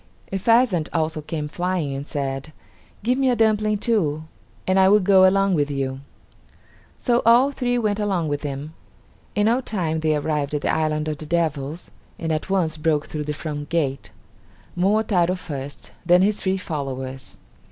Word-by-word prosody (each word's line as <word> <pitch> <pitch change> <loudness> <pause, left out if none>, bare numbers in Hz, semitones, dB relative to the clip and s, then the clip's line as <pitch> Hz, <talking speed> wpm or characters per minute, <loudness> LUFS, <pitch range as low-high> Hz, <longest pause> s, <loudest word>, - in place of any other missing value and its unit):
A 195 - -1
pheasant 225 -6 +3
also 160 -1 -1
came 150 0 -4
flying 175 -2 -2
and 140 +2 -5
said, 140 +1 -4 0.5
"Give 250 +4 +1
me 265 -1 +3
a 245 - +3
dumpling 215 -2 +2
too, 170 -9 0 0.4
and 185 +1 +3
I 190 0 +6
will 210 +1 +6
go 190 -1 +6
along 195 0 +3
with 145 -3 +1
you." 135 -2 -2 1.0
So 240 -2 +2
all 240 +5 +5
three 245 -3 -1
went 215 -3 0
along 190 -6 0
with 145 -1 -2
him. 145 +1 -5 0.6
In 205 +1 +2
no 235 +4 +3
time 170 -9 -2
they 155 -1 +1
arrived 150 -1 -1
at 145 - -1
the - - 0
island 155 -1 0
of 150 -1 -3
the 155 - -7
devils, 160 -1 -2 0.3
and 165 -1 -3
at 155 +4 -2
once 170 -5 0
broke 155 -1 +1
through 150 -1 -4
the 150 - -2
front 145 -1 -5
gate; 140 -5 -1 0.7
Momotaro 185 -1 +2
first; 145 -6 -7
then 180 +1 +5
his 210 +1 +1
three 190 0 0
followers. 135 -6 -5
165 Hz, 175 wpm, -23 LUFS, 150-200 Hz, 1.0 s, I